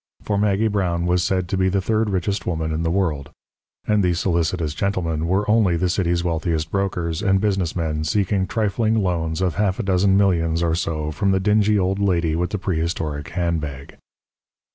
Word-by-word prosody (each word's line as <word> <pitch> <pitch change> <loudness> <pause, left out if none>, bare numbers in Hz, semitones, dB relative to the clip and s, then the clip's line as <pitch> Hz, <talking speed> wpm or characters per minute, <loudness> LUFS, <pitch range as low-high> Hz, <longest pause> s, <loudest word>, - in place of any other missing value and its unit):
For 105 - -1
Maggie 105 +1 +2
Brown 90 -5 0
was 90 0 +2
said 95 -2 0
to 95 - -1
be 95 0 +2
the 100 +1 +1
third 110 +3 0
richest 100 +1 -2
woman 80 -2 -1
in 80 +1 -2
the 80 - 0
world; 80 -6 -1 0.6
and 105 -1 +2
these 90 -2 +1
solicitous 85 -3 0
gentlemen 85 -4 -1
were 95 +4 +1
only 105 -5 +3
the 90 +2 0
city's 85 -1 0
wealthiest 80 -2 -1
brokers 90 -5 -1
and 95 0 +2
business 95 -5 0
men 80 -3 -2
seeking 95 +3 0
trifling 110 +1 0
loans 85 -2 -1
of 90 -5 0
half 100 -2 +1
a 120 - -2
dozen 95 0 +3
millions 85 -4 +2
or 85 -1 +1
so 75 -2 -2
from 85 +6 -1
the 95 0 +2
dingy 105 +1 +3
old 95 0 0
lady 85 -5 +1
with 90 +1 -1
the 105 - -2
prehistoric 80 -5 -2
handbag. 80 -6 -3
90 Hz, 185 wpm, -22 LUFS, 80-100 Hz, 0.6 s, only